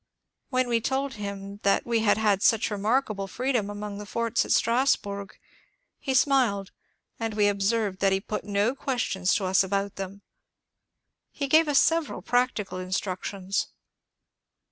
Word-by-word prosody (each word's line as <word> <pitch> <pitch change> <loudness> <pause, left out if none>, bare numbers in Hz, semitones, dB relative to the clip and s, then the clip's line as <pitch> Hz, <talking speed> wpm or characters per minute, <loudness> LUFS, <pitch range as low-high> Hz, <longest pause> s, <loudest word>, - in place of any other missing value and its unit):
When 255 -1 +1
we 235 -1 +1
told 270 +3 -1
him 200 -1 -6
that 200 - +2
we 235 -1 +1
had 210 -2 +3
had 210 -3 +2
such 225 0 +3
remarkable 210 -1 0
freedom 240 -1 -1
among 205 0 -6
the 210 - -8
forts 230 +2 0
at - - -5
Strasburg 205 -5 +1 0.6
he 265 -2 -2
smiled, 245 -8 +2 0.5
and 225 -2 -3
we 210 -1 +3
observed 200 0 0
that 195 -1 +3
he 190 - +2
put 210 +2 -5
no 205 +4 +1
questions 240 -9 0
to 200 - 0
us 185 +1 +4
about 200 +1 -2
them. 195 +1 -7 1.1
He 280 - -4
gave 315 +3 +5
us 290 -2 +2
several 330 0 +2
practical 245 -6 0
instructions. 190 +1 -2
210 Hz, 145 wpm, -26 LUFS, 195-245 Hz, 1.1 s, gave